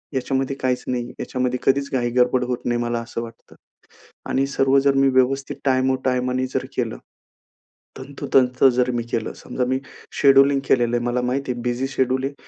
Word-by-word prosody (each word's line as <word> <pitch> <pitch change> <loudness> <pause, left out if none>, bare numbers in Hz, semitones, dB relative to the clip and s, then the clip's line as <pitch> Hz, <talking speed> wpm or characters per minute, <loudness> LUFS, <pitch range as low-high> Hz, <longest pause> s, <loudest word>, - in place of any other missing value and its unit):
याच्यामध्ये 135 +1 -1
काहीच 130 -2 -1
नाही. 120 -1 -2
याच्यामध्ये 125 -1 -2
कधीच 140 +1 +1
घाई 120 -2 0
गडबड 125 0 +3
होत 125 -1 -4
नाही, 120 0 0
मला 120 0 -1
असं 115 0 -6
वाटतं. 115 -1 -12 0.7
आणि 135 - +1
सर्व 135 0 +2
जर 140 0 +3
मी 135 0 +4
व्यवस्थित 135 +1 +1
टाईमो 130 0 +2
टाईमानी 125 0 0
जर - - -1
केलं, - - -2 1.0
तंतोतंत 130 -2 0
जर 125 +1 +1
मी 120 - -1
केलं. 115 -2 -2
समजा 125 - -3
मी 130 0 +1 0.4
शेड्यूलिंग 135 0 +5
केलेलं 120 -1 +2
आहे, 120 - -2
मला 120 +1 0
माहिती 125 +1 -1
आहे 120 - -6
बिझी 125 +2 -1
शेड्यूल 130 -1 0
आहे 140 - -2
130 Hz, 175 wpm, -22 LUFS, 125-135 Hz, 1.0 s, शेड्यूलिंग